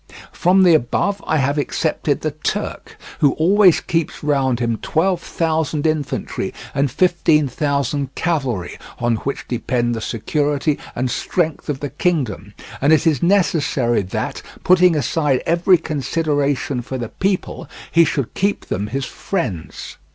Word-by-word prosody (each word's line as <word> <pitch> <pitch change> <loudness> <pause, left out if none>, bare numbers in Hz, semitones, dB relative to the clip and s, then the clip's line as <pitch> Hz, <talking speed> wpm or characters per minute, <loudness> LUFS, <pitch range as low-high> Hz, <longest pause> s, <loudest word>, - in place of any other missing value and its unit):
From 190 +2 +3
the 175 -2 +6
above 180 +8 +1
I 155 - +2
have 140 +1 +1
excepted 140 - -1
the - - -1
Turk, - - -4 0.2
who 140 -2 +4
always 185 +2 +4
keeps 165 -3 -2
round 135 -4 +1
him 115 -2 0
twelve 175 +2 +1
thousand 160 -3 -1
infantry 155 -3 -2 0.2
and 140 0 +1
fifteen 160 -1 +2
thousand 140 0 -1
cavalry 135 - -2 0.2
on 120 -1 0
which 140 +5 -5
depend 120 0 -1
the 115 - -4
security 145 +6 -1 0.2
and 125 0 -1
strength 160 -5 -2
of 140 -2 -2
the 145 -3 -4
kingdom, 120 - -2 0.3
and 140 +3 +3
it 160 +1 +4
is 155 -6 +2
necessary 150 - +2
that, 95 - -4 0.2
putting 180 -2 +5
aside 145 -1 0
every 175 +2 +4
consideration 145 -3 -1
for 130 +2 -5
the 120 -3 -5
people, 190 -1 -2 0.2
he 170 - +6
should 140 -6 -2
keep 200 +2 -1
them 100 +3 -3
his 135 +4 -3
friends. 100 - -4
145 Hz, 145 wpm, -19 LUFS, 130-165 Hz, 0.3 s, the